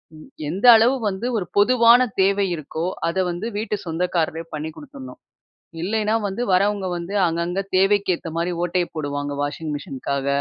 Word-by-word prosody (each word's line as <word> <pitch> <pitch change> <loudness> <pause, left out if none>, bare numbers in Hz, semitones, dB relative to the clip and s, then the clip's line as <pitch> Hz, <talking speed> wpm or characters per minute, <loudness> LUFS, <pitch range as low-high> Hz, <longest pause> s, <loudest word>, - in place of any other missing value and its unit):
ம். 155 - -13 0.2
எந்த 190 +8 -2
அளவு 230 +4 +4
வந்து 195 +5 -4
ஒரு 190 - -2
பொதுவான 240 +3 +5
தேவை 200 +1 +2
இருக்கோ, 160 +2 -5 0.2
அத 170 - -4
வந்து 175 +6 -4
வீட்டு 210 0 -2
சொந்தக்காரரே 165 -1 -1
பண்ணி 155 +1 -5
குடுத்துர்ணும். 275 -2 -11 0.6
இல்லைனா 215 +3 0
வந்து 195 +5 -4
வரவங்க 200 +1 +2
வந்து 175 +3 -6
அங்கங்க 170 +3 -2 0.2
தேவைக்கேத்த 195 -3 +1
மாரி 170 +2 -1
ஓட்டைய 175 0 0
போடுவாங்க 145 -1 -3
வாஷிங் 150 +2 -4
மிஷினுக்காக. 140 -1 -4
185 Hz, 145 wpm, -22 LUFS, 165-210 Hz, 0.6 s, பொதுவான